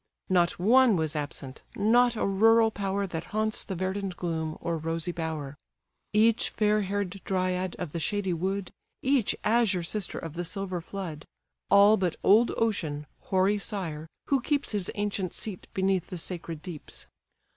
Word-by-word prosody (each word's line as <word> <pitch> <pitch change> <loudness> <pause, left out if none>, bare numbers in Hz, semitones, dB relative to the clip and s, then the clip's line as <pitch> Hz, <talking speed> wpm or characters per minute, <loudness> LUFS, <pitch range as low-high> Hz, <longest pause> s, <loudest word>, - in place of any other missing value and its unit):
Not 175 -2 +3
one 235 +4 +5
was 160 -3 0
absent, 145 -2 -4
not 240 +3 +4
a - - 0
rural 225 +3 +5
power 200 -1 -1
That 165 -3 -5
haunts 215 +1 -1
the 190 - -5
verdant 190 +1 -3
gloom, 160 -3 -2
or 170 - -2
rosy 165 +2 -2
bower; 160 -4 -4 0.6
Each 220 +2 +3
fair 210 0 +2
hair'd 200 -1 -3
dryad 185 -1 -1
of 175 -5 -5
the 170 - -3
shady 195 +2 0
wood, 190 +3 -2 0.3
Each 260 -5 +2
azure 215 -5 +2
sister 200 +3 -2
of 165 -2 -6
the 175 +1 -3
silver 185 -1 -3
flood; 165 -4 -6 0.4
All 200 +2 +7
but 180 -4 0
old 220 +4 +5
Ocean, 160 -10 -1 0.2
hoary 195 +2 +2
sire! 165 -7 -4 0.2
who 275 -2 +2
keeps 285 +3 0
His 200 -4 -2
ancient 205 -3 -2
seat 205 -5 -6
beneath 190 -2 +1
the 180 - -6
sacred 165 -2 -6
deeps. 175 -5 -8
190 Hz, 155 wpm, -28 LUFS, 170-210 Hz, 0.6 s, All